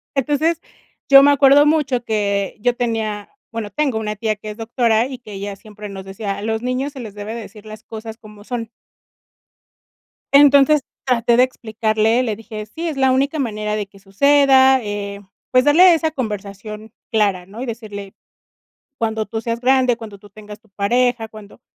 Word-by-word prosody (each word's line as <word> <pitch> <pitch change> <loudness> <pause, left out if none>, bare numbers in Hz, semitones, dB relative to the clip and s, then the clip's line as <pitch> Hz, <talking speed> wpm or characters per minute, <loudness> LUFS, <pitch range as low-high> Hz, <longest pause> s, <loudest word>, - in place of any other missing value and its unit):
Entonces, 295 +4 0 0.5
yo 275 0 +9
me 285 - +6
acuerdo 285 +1 +6
mucho 285 -5 +1
que 200 -3 -1
yo 245 +3 +1
tenía, 220 -4 -3 0.2
bueno, 225 -2 -5
tengo 270 -1 0
una 210 -1 -3
tía 215 0 -1
que 215 +1 -9
es 210 - -11
doctora 230 0 +1
y 260 -2 -8
que 215 -4 -12
ella 200 +1 -5
siempre 210 +1 -11
nos 195 -1 -8
decía: 195 +1 -5
"A - - -7
los 220 +1 -2
niños 255 +3 -2
se 270 - -9
les 220 -5 -8
debe 205 +1 -6
de 235 - -5
decir 210 0 -12 0.3
cosas 220 0 -8
como 210 -2 -15
son". 230 -1 -5 1.6
Entonces, 285 +1 +6 0.3
traté 235 -2 +2
de 250 - +6
explicarle, 220 -1 0
le 220 -4 -2
dije: 215 -1 -8
"Sí, 330 +10 -5
es 310 - -4
la 265 -1 +3
única 275 +4 0
manera 215 -5 -2
de 210 -1 -3
que 195 0 -19
suceda", 265 +6 +4
eh, 200 -1 -5 0.3
pues, 255 0 +4
darle 345 +5 +7
esa 320 -1 0
conversación 210 -3 -6 0.2
clara, 200 -5 +1
¿no? 210 +6 -9
Y - - -4
decirle: 210 -4 -7 0.8
"Cuando 220 -2 -1
tú 225 +2 -4
seas 230 +1 -3
grande, 255 -1 +3
cuando 220 -3 -10
tú 205 +1 -17
tengas 210 +1 -12
tu 220 - -29
pareja, 230 +3 0
cuando 215 0 -14
225 Hz, 180 wpm, -19 LUFS, 210-260 Hz, 1.6 s, yo